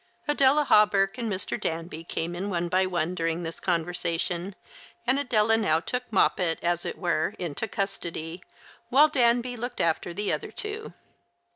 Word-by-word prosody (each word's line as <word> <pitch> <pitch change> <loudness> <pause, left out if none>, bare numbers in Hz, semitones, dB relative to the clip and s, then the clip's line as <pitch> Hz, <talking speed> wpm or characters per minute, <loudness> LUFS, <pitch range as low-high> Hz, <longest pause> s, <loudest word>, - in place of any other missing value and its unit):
Adela 295 0 +4
Hawberk 205 -3 +4
and 230 -2 -2
Mr. 190 -1 -3
Danby 165 0 -4
came 165 0 -3
in 195 +3 -3
one 175 -2 -1
by 185 +1 +2
one 175 -1 -1
during 165 0 -1
this 165 0 -6
conversation, 175 +1 -2 0.5
and 260 +3 +3
Adela 225 -5 +3
now 160 -8 +2
took 250 +8 -4
Moppet, 180 -4 +2
as 175 0 0
it - - -4
were, 175 +1 0
into 175 +4 -3
custody, 175 -4 -4 0.5
while 285 +5 +6
Danby 245 -2 +2
looked 245 +1 -5
after 165 +1 +1
the 205 +3 -1
other - - -3
two. 425 +1 -5
190 Hz, 155 wpm, -27 LUFS, 170-235 Hz, 0.5 s, while